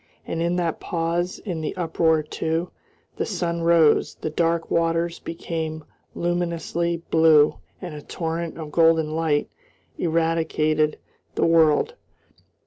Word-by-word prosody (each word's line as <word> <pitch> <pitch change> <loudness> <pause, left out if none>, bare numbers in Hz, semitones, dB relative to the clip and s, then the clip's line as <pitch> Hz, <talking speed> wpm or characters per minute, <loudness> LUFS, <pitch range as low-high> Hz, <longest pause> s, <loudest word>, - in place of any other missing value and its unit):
And 165 - -3
in 170 +1 +1
that 170 -3 -1
pause 170 +1 -2
in 175 -6 -5
the 155 - -3
uproar 160 -3 +1
too, 160 +3 -2 0.5
the - - -1
sun 170 -4 -2
rose, 165 -2 +4
the 155 - -5
dark 165 +1 0
waters 165 0 +1
became 160 -1 -5 0.3
luminously 170 -1 -1
blue, 160 -2 +5 0.2
and 175 -3 -7
a 150 - -7
torrent 165 +1 -4
of 155 -2 -7
golden 160 -1 +3
light 160 -3 +1 0.5
irradiated 160 -2 +1 0.4
the - - +2
world. 165 - +4
165 Hz, 125 wpm, -23 LUFS, 160-170 Hz, 0.5 s, blue